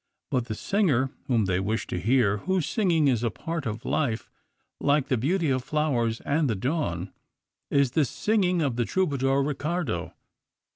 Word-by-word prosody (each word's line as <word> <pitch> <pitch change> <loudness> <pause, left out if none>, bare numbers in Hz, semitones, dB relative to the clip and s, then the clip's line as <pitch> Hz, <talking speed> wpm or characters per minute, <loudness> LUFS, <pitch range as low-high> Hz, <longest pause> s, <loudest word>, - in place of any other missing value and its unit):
But 125 -2 +1
the 110 -3 -4
singer 145 - +1 0.2
whom 115 -6 +2
they 95 -1 +1
wish 105 +4 -1
to 90 - -3
hear, 110 -1 +3
whose 180 - -1
singing 170 -9 +2
is 120 -5 +2
a 115 - +2
part 165 +4 -4
of 110 +1 -5
life, 120 -7 -1 0.5
like 145 -1 +2
the 130 - +3
beauty 155 - +1
of 130 -1 0
flowers 125 -7 0
and 145 -1 +1
the 110 - +1
dawn, 100 - -2 0.6
is 140 -3 +3
the 155 - +3
singing 180 - +1
of 130 -5 -1
the 120 - +1
troubadour 140 -6 +1
Riccardo. 145 - -2
135 Hz, 165 wpm, -26 LUFS, 115-155 Hz, 0.6 s, hear